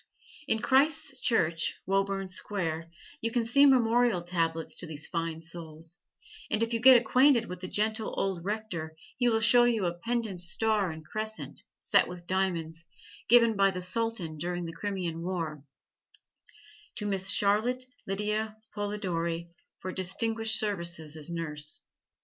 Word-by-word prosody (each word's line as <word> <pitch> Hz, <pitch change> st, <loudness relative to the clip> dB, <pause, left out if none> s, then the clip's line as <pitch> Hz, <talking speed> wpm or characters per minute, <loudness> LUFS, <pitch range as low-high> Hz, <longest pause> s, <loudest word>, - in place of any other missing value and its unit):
In 220 Hz, 0 st, 0 dB
Christ's 275 Hz, 0 st, +3 dB
Church, 170 Hz, -10 st, +2 dB
Woburn 195 Hz, 0 st, 0 dB
Square, 170 Hz, -4 st, -3 dB, 0.3 s
you 230 Hz, -, 0 dB
can 230 Hz, 0 st, 0 dB
see 280 Hz, +5 st, +6 dB
memorial 240 Hz, -6 st, +3 dB
tablets 165 Hz, -2 st, -2 dB
to 175 Hz, -, -2 dB
these 150 Hz, -1 st, -2 dB
fine 165 Hz, -1 st, -3 dB
souls, 165 Hz, 0 st, -6 dB, 0.5 s
and 215 Hz, -, +2 dB
if 230 Hz, +1 st, -2 dB
you 230 Hz, -, +1 dB
get 255 Hz, +1 st, +9 dB
acquainted 245 Hz, +1 st, +4 dB
with 180 Hz, -3 st, -7 dB
the 185 Hz, -, -6 dB
gentle 215 Hz, +3 st, -1 dB
old 190 Hz, -3 st, -1 dB
rector 185 Hz, -6 st, -4 dB, 0.2 s
he 245 Hz, -1 st, +3 dB
will 225 Hz, -1 st, +1 dB
show 240 Hz, +2 st, +6 dB
you 225 Hz, -5 st, +1 dB
a 170 Hz, -, 0 dB
pendant 220 Hz, 0 st, -2 dB
star 205 Hz, +2 st, +1 dB
and 160 Hz, -1 st, -8 dB
crescent, 215 Hz, +3 st, -4 dB, 0.2 s
set -, -, +4 dB
with 175 Hz, -1 st, -9 dB
diamonds, 170 Hz, -3 st, -1 dB, 0.5 s
given 230 Hz, -1 st, +6 dB
by 195 Hz, 0 st, +4 dB
the 185 Hz, -1 st, -4 dB
Sultan 185 Hz, -6 st, -1 dB
during 175 Hz, +1 st, -3 dB
the 165 Hz, -, -6 dB
Crimean 175 Hz, -3 st, -4 dB
war, 165 Hz, -5 st, -3 dB, 1.3 s
"To 220 Hz, -3 st, -4 dB
Miss 195 Hz, -1 st, 0 dB
Charlotte 220 Hz, +6 st, +2 dB, 0.2 s
Lydia 210 Hz, +2 st, -2 dB, 0.2 s
Polidori 170 Hz, -5 st, -3 dB, 0.3 s
for 185 Hz, -, -4 dB
distinguished 220 Hz, +4 st, +1 dB
services 170 Hz, -7 st, -2 dB
as 155 Hz, 0 st, -6 dB
Nurse." 155 Hz, -3 st, -4 dB
195 Hz, 145 wpm, -29 LUFS, 170-225 Hz, 1.3 s, get